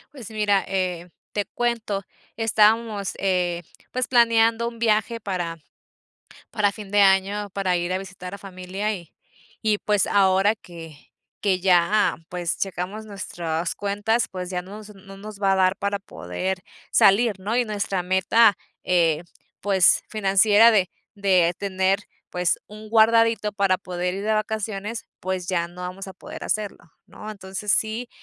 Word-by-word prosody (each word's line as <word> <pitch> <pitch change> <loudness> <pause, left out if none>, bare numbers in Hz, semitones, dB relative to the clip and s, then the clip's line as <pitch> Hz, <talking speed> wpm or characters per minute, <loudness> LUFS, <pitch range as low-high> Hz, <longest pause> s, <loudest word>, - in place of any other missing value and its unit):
Pues 230 -6 -9
mira, 205 -2 +2
eh, 180 -2 -2 0.2
te 205 - 0
cuento. 225 -2 -2 0.4
Estábamos, 220 -2 +2
eh, 180 -2 0 0.3
pues 255 0 -1
planeando 230 -1 +4
un 230 -1 -14
viaje 225 0 +1
para 180 -5 -3 0.9
para 205 -2 +1
fin 205 -2 -10
de 205 - +3
año 200 +1 +3
para 185 -3 0
ir 175 +1 -2
a - - +1
visitar 190 -1 -8
a - - -6
familia, 195 +2 -4
y 170 -5 -10 0.5
y 215 -1 +2
pues 210 -1 +1
ahora 195 +1 +3
que 165 -7 -12 0.4
que 190 -3 +1
ya, 185 +3 +3
pues 175 -2 -3
checamos 195 +3 -4
nuestras 175 -5 -4
cuentas, 205 +3 0
pues 180 -1 -6
ya 180 -1 -2
nos 205 +3 -11
nos 195 0 -18
no 195 0 -11
nos 205 0 -10
va 195 -1 +3
a - - +2
dar 185 0 +2
para 200 0 -2
poder 185 - -4 0.3
salir 200 0 +4
¿no? 210 +5 -2
Y 250 - +3
nuestra 200 -4 -2
meta, 190 +4 +4 0.3
eh, 165 -3 +2 0.4
pues, 190 -2 +4
financiera 210 +2 +5
de 190 -4 +2 0.3
de 185 -4 +3
tener, 190 0 +1 0.3
pues 180 -1 0
un 215 0 -11
guardadito 225 -1 +4
para 195 -2 +2
poder 180 -1 -3
ir 200 - -5
de 220 - +2
vacaciones, 215 0 -3 0.2
pues 185 -1 -3
ya 170 -2 -1
no 175 +1 -14
vamos 180 +2 -6
a 190 - -8
poder - - -9
hacerlo, 205 -5 -3
¿no? 215 - -9
Entonces 195 0 -4
sí 225 +3 0
195 Hz, 155 wpm, -23 LUFS, 185-215 Hz, 0.9 s, financiera